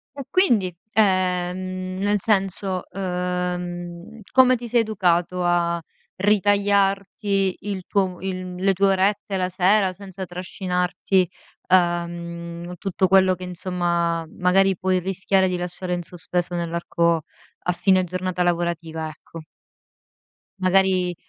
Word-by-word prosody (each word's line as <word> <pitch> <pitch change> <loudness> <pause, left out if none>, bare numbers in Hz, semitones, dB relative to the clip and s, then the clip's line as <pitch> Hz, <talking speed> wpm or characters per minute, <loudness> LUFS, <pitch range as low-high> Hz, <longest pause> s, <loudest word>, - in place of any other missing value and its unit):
E 280 - -6
quindi? 220 - +2 0.2
Ehm, 185 -2 0
nel 205 +1 +1
senso, 195 -2 +2
uhm, 180 0 -4
come 255 -1 +5
ti 240 0 -7
sei 235 0 +3
educato 180 -4 0
a 170 -1 +1 0.4
ritagliarti 200 -1 +1
il 195 -3 -5
tuo 190 -3 0
il 185 -1 -5
le 190 +2 +2
tue 195 +2 +2
orette 195 +1 +1
la 185 -1 0
sera 185 +1 +2
senza 190 0 -8
trascinarti, 180 0 -1 0.4
uhm, 170 -1 -1
tutto 190 +1 0
quello 190 0 +5
che, 185 - -10
insomma, 175 -2 -1
magari 190 +1 +3
puoi 185 +1 +1
rischiare 190 +1 +1
di 180 - -1
lasciare 180 +1 -4
in 175 - -2
sospeso 175 +1 -2
nell'arco, 170 -1 0 0.4
a 180 - +1
fine 185 +1 +3
giornata 185 0 -2
lavorativa, 170 -2 -1
ecco? 160 +1 -11 1.2
Magari 185 -1 +2
185 Hz, 115 wpm, -23 LUFS, 175-195 Hz, 1.2 s, come